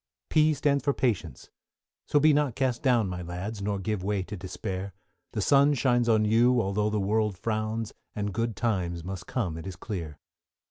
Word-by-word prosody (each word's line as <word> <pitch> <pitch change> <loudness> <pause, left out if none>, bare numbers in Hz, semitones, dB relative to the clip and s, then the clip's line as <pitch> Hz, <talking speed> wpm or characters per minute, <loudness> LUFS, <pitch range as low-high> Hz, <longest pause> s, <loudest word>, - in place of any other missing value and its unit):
=P= 155 0 +4
stands 140 -1 +1
for 140 - +1
Patience, 120 -7 -2 0.6
so 145 - +3
be 155 +1 +5
not 145 -5 +1
cast 130 -3 0
down, 120 -6 +3
My 90 -1 -4
lads, 90 +5 -5
nor 100 0 -1
give 100 0 -2
way 100 -1 0
to 105 - -7
despair; 95 0 -5 0.4
The - - -1
sun 140 +1 +5
shines 120 -2 +2
on 110 -1 +4
you, 120 +3 +4
although 105 0 0
the 105 0 0
world 105 0 0
frowns, 110 +1 -2 0.2
And 105 -1 -2
good 115 +1 -1
times 90 -7 -1
must 95 0 -6
come 90 -11 -2
it 80 - -8
is 95 - -6
clear. 85 -6 -6
110 Hz, 185 wpm, -28 LUFS, 95-120 Hz, 0.6 s, be